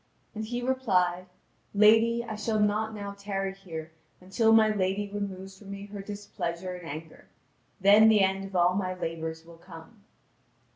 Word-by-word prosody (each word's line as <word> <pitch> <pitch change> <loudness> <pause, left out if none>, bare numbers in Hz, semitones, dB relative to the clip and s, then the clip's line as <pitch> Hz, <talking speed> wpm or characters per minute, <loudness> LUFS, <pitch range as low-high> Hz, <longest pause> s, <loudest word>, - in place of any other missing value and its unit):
And 220 0 -4
he 240 +2 -4
replied: 185 -9 +1 0.5
"Lady, 225 +3 +5
I 220 -2 -5
shall 215 +1 -1
not 215 +1 +1
now 200 -1 -6
tarry 195 -1 -3
here 165 -5 -8 0.3
until 210 +5 +1
my 220 -1 +6
lady 195 +1 -1
removes 195 -1 -6
from 200 - -13
me 200 0 -7
her 205 -1 -8
displeasure 185 -3 -5
and 180 -2 -8
anger: 155 +2 -9 0.5
then 205 +3 +7
the 215 -2 +5
end 190 0 +1
of 195 -1 -9
all 175 0 +4
my 185 -1 -2
labours 160 -2 -5
will 170 0 -14
come." 170 +6 -14
195 Hz, 160 wpm, -28 LUFS, 180-215 Hz, 0.5 s, then